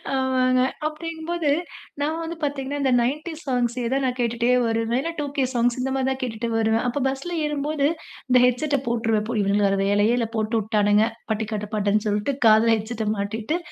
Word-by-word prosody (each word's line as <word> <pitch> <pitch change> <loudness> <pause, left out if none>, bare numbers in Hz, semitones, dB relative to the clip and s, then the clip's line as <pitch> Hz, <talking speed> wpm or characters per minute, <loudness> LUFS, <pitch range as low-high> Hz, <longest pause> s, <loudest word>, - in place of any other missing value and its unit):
ஆமாங்க, 255 -1 +2 0.3
அப்டிங்கும்போது 325 +1 -3 0.5
நான் 310 +3 -1
வந்து 330 +1 -5
பாத்தீங்கன்னா, 285 0 -2
இந்த 270 -2 +2
90ஸ் 305 +6 -3
சாங்ஸ்சே 245 -1 0
தான் 275 0 +1
நான் 250 0 -1
கேட்டுட்டே 235 0 0 0.2
வருவேன். 225 +1 0
இல்ல, 335 - -3
2கே 280 -2 -1
சாங்ஸ், 240 0 +1
இந்த 265 +1 -1
மாதிரி 265 0 0
தான் 265 - -3
கேட்டுட்டு 235 -1 -3
வருவேன். 225 0 +2
அப்போ 250 +3 -1
பஸ்ல 275 +6 -3
ஏறும்போது 295 0 0 0.4
இந்த 250 0 +6
ஹெட்செட்ட 280 +3 +1
போட்டுருவேன். 225 -2 0
போ 240 - -2
"இவனுங்களுக்கு 200 +1 +2
வேற 195 0 +1
வேலையே 205 +3 +3
இல்ல, 230 -2 0
போட்டு 220 +1 0
உட்டானுங்க" 210 0 +3 0.3
பட்டிக்காட்டு 215 -1 -3
பாட்டுன்னு 210 0 +1
சொல்ட்டு 210 +6 0
காதுல 225 +1 +5
ஹெட்செட்ட 220 0 -4
மாட்டிட்டு 220 +9 -2
245 Hz, 170 wpm, -23 LUFS, 220-280 Hz, 0.5 s, இந்த